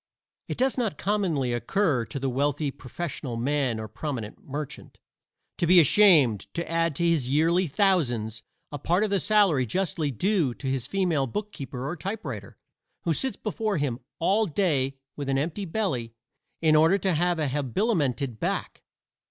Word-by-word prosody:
It - - -4
does 260 +1 +1
not 225 -5 -1
commonly 175 -12 0
occur 130 - +1
to 125 +5 -5
the 135 - -2
wealthy 140 +2 0
"professional 130 -3 -6
man," 130 -2 0
or 110 - -5
"prominent 115 -1 -6
merchant," 145 +1 -7 0.6
to 170 - +1
be 180 +1 +8
ashamed 155 - +5
to 170 0 -2
add 165 -2 0
to 170 +4 +1
his 155 -7 +1
yearly 165 +6 +3
thousands 125 - +1 0.3
a 145 - -5
part 175 +8 +1
of 215 - -1
the 200 - +3
salary 200 -12 +3
justly 160 - -1
due 160 - 0
to - - -10
his 130 -2 -1
female 170 -7 +1
bookkeeper 135 - -5
or 165 - -3
typewriter, 200 +6 -6 0.5
who 165 - +1
sits 265 - -1
before 215 -2 -2
him 135 -5 -1 0.2
all 205 +6 +2
day 145 -7 0 0.2
with 140 -2 -4
an 135 - +2
empty 165 +8 -2
belly 150 - -2 0.5
in 155 -1 +5
order 160 +5 +5
to 190 -1 0
have 175 +2 +1
an 155 -3 0
habilimented 140 - -1
back. - - -3
155 Hz, 160 wpm, -26 LUFS, 130-190 Hz, 0.6 s, be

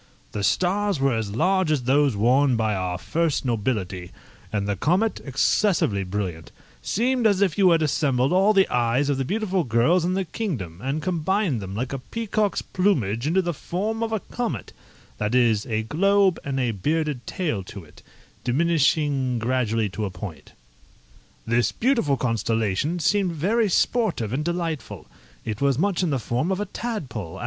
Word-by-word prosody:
The 100 - -4
stars 185 - +1
were 135 -1 +2
as 110 -2 -3
large 185 +5 +2
as 150 -5 +1
those 135 0 +3
worn 125 +5 +3
by 110 -1 +1
our 90 -2 -2
first 160 - -1
nobility, 100 -6 -2 0.4
and 100 -2 -1
the 100 - 0
comet, 180 - +1
excessively 135 - +1
brilliant, 90 -4 -4 0.3
seemed 245 - +1
as 200 -3 +2
if 190 -6 +2
you 190 -3 +5
had 165 -2 +3
assembled 140 -2 +1
all 195 +3 +4
the 195 -2 +4
eyes 125 +4 +1
of 135 - -1
the - - +1
beautiful 195 - -1
girls 125 +9 +2
in 180 +2 0
the 190 0 -1
kingdom, 125 - -4
and 140 +5 -2
combined 180 - 0
them, 95 0 -6
like 125 +5 -3
a 135 - -3
peacock's 215 - -2
plumage, 130 - 0
into 185 +4 +2
the 175 0 -1
form 210 +9 -3
of 225 -1 -1
a 220 -3 -1
comet 230 - -4 0.5
that 105 +3 0
is, 115 -3 +3
a 110 -2 -1
globe, 195 - +2
and 135 -1 -2
a 125 -3 +1
bearded 150 - -2
tail 155 - -2
to 100 0 -9
it, 80 - -18 0.4
diminishing 140 -2 +1
gradually 115 -2 0
to 105 +2 -4
a - - -3
point. 90 -1 -9 0.9
This 115 +1 +2
beautiful 230 - +1
constellation 115 - 0
seemed 180 +3 +1
very 205 +8 +1
sportive 175 - +1
and 145 +4 -1
delightful. 170 -3 -3 0.4
It 110 +1 -4
was 140 -2 +2
much 190 +3 +1
in 180 - +1
the 140 - +1
form 125 - -1
of 190 - -1
a 205 - -1
tadpole! 165 - -5
140 Hz, 170 wpm, -24 LUFS, 115-185 Hz, 0.9 s, you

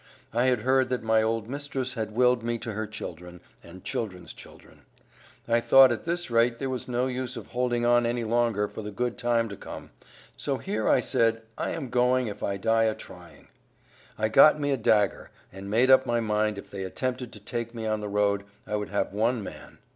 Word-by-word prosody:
I 120 +2 +2
had 125 -4 +2
heard 130 +1 +2
that 125 -3 -2
my 110 0 +3
old 110 0 -1
mistress 135 -1 -4
had 110 -3 -4
willed 125 0 +3
me 120 +1 -2
to 115 0 -6
her 110 +1 -4
children, 90 -4 -8 0.2
and 90 +2 -13
children's 95 -6 -5
children. - - -16 0.7
I 115 0 +3
thought 135 +2 +7
at 120 - -3
this 175 -4 -2
rate 115 +1 +3
there 135 +2 -3
was 130 - -4
no 125 0 0
use 125 -1 -4
of 115 - -7
holding 120 -1 -1
on 120 0 +4
any 120 0 -1
longer 115 -2 +1
for 110 - -8
the 105 - -6
good 120 +3 -2
time 120 -1 +1
to 100 - -7
come, - - -10 0.4
so - - -2
here - - -2
I - - +4
said, 115 0 +1
I - - -3
am 140 -6 -4
going, 125 +1 +2
if 105 -2 -6
I 100 0 -2
die 115 +3 +2
a 110 -1 +1
trying. - - -14 0.7
I 110 - +1
got 150 +7 +6
me 145 -1 0
a 135 - +1
dagger, 105 -4 +1 0.2
and 95 +1 -8
made 120 +5 +4
up 130 0 +6
my 120 0 +1
mind 105 -1 0
if 100 - -10
they 95 -1 -5
attempted 125 +5 -3
to 105 - -10
take 115 +2 -5
me 115 -1 -5
on 110 -1 -1
the 105 - -4
road, 100 0 +1 0.2
I 105 - -2
would 105 - -4
have 100 -1 -1
one 115 +2 0
man. - - -10
115 Hz, 215 wpm, -27 LUFS, 105-125 Hz, 0.7 s, thought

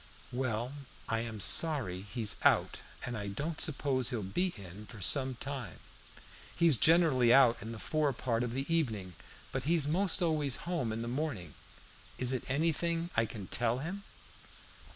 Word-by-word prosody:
"Well, 125 0 -2 0.3
I 115 - 0
am 115 -2 -5
sorry 120 - +3
he's 105 +1 -2
out, - - +3 0.3
and 120 - -4
I 105 -2 -4
don't 150 +11 -3
suppose 135 -5 +1
he'll 115 -4 -3
be 180 - 0
in 100 +2 -10
for 115 - -11
some 130 +5 +3
time. 130 - -6 0.8
He's 170 -4 +5
generally 150 -6 +5
out 125 -2 +5
in 110 +2 -6
the 115 - -7
fore 150 +5 0
part 115 -2 -2
of 120 -1 -2
the 135 +1 -2
evening; 110 - -1 0.4
but 130 0 -3
he's 160 -1 +3
most 180 +3 +2
always 150 -6 +1
home 170 -10 -1
in 115 +1 -3
the - - -5
morning. 120 - -3 0.6
Is 125 0 +1
it 130 - -4
anything 165 +4 0
I 115 0 +2
can 105 -4 -7
tell 120 +4 -1
him?" 175 +9 -5
130 Hz, 165 wpm, -32 LUFS, 115-155 Hz, 0.8 s, He's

